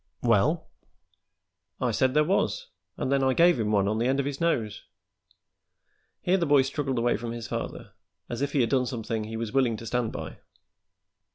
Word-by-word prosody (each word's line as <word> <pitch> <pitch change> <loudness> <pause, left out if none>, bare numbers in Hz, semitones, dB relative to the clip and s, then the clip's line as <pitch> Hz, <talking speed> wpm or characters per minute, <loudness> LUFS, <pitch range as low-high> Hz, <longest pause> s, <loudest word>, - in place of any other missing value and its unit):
"Well?" 125 - +2 1.1
"I - - +1
said 130 +1 +1
there 150 - +5
was, 485 - 0 0.3
an' - - -2
then 140 0 +2
I 130 -1 +2
gave 170 -5 +5
him 105 -1 0
one 100 -2 +3
on 110 +2 0
the 120 - +1
end 135 +1 +1
of 140 - 0
his 140 +1 -4
nose." 115 -11 0 1.4
Here 185 +2 +3
the 170 -3 0
boy 145 -2 +5
struggled 135 -1 -2
away 120 +1 +2
from 115 0 -5
his 115 -2 -6
father, - - -5 0.4
as 120 - -5
if 140 - -1
he 140 - +3
had 115 - +1
done 130 -2 +2
something 115 -3 -3
he 110 +1 -5
was 115 0 -4
willing 125 -5 +2
to 115 - -9
stand 120 -1 -1
by. - - -7
130 Hz, 195 wpm, -27 LUFS, 115-145 Hz, 1.4 s, there